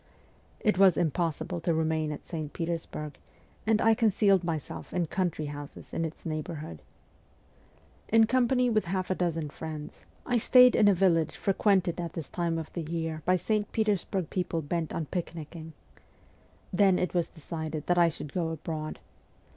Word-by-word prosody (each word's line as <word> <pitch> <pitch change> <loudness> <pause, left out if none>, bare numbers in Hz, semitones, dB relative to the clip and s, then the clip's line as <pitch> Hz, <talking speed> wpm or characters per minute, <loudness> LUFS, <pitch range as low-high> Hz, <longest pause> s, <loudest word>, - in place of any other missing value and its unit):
It 210 -3 +2
was 190 -4 +6
impossible 170 +1 -1
to 165 0 0
remain 160 -1 0
at 150 - -7
St. 155 -3 -5
Petersburg, 165 -3 -4 0.5
and 220 -1 +4
I 225 0 +5
concealed 205 -4 +3
myself 165 -3 -4
in 180 -1 +1
country 170 -2 -1
houses 145 0 -8
in 165 - 0
its 160 +2 -8
neighbour 160 +1 -3
hood. 85 - -8 1.3
In 225 0 +6
company 250 +1 +2
with 215 -4 +2
half 185 +1 -2
a - - +4
dozen 165 -5 -1
friends, 155 -1 -7 0.2
I 245 - +2
stayed 250 +2 +7
at 205 - +6
a 200 - +4
village 170 -3 +2
frequented 190 -3 +1
at 170 - -5
this 165 -4 -6
time 170 -2 -1
of 160 -1 -6
the 170 - -3
year 160 0 -3
by 185 - +4
St. 210 +3 -1
Petersburg 200 -5 0
people 175 -3 -1
bent 160 +2 -2
on 160 - -2
picnicking. 165 -1 -6 1.0
Then 190 0 +4
it 180 - -1
was 175 -2 +1
decided 160 -1 -6
that 175 0 +2
I 170 -1 +6
should 150 -3 -8
go 170 -3 0
abroad. 155 -1 -4
170 Hz, 165 wpm, -29 LUFS, 160-190 Hz, 1.3 s, stayed